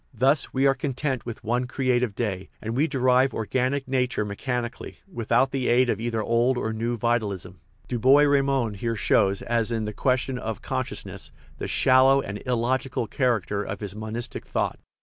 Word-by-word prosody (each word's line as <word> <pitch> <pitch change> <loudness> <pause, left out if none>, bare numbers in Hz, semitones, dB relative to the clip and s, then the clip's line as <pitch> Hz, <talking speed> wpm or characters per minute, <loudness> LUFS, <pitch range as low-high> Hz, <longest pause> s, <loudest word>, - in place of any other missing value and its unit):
Thus 135 +5 +2
we 135 +1 +1
are 135 - +5
content 135 -2 -3
with 120 0 -6
one 120 +3 0
creative 125 -4 0
day, 95 -5 -3
and 110 +2 -4
we 145 +5 +2
derive 130 -2 +2
organic 130 +5 -1
nature 125 -4 0
mechanic 120 +4 -3
ally, - - -8
without 125 - +1
the 135 -2 -1
aid 120 0 +4
of 105 - -2
either 115 -2 -1
old 120 +3 +2
or 110 -2 -2
new 115 +2 -2
vitalism." 100 -7 -2 0.3
Du 120 - -2
Bois 135 +5 +6
Reymond 135 -6 +1
here 115 +3 -2
shows, 100 -2 +2
as 115 -1 0
in 110 -2 -1
the 105 - -4
question 130 +2 0
of 110 -3 -5
consciousness, - - -4 0.3
the - - -3
shallow 130 +1 +5
and 105 -6 -5
illogical 125 +1 0
character 110 -5 0
of 100 -1 -5
his 105 -2 -6
monistic 110 +2 -5
thought. - - -1
120 Hz, 175 wpm, -25 LUFS, 110-130 Hz, 0.3 s, Bois